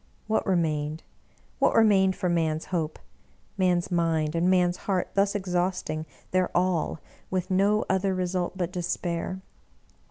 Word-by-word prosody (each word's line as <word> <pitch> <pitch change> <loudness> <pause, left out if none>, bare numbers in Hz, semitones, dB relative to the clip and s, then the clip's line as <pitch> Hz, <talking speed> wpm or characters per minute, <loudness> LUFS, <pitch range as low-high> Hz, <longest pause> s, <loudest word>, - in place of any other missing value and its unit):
What 220 0 0
remained 155 -4 0 0.3
— - - -35
^what - - +4
remained 195 -4 +5
for 185 - -2
man's 160 -2 0
hope? 160 -3 -1 0.3
— - - -36
man's 180 -1 +2
mind 165 -3 +1
and 170 +2 +2
man's 180 -1 +3
heart 185 -2 +1
thus 200 +1 +2
exhausting. 180 -4 -1 0.2
their 185 -1 +2
all 175 -3 0 0.3
with 185 0 -2
no 200 +3 +3
other 190 0 +1
result 185 0 -2
but 180 -2 -2
despair! 175 +1 -3
180 Hz, 145 wpm, -27 LUFS, 170-190 Hz, 0.3 s, remained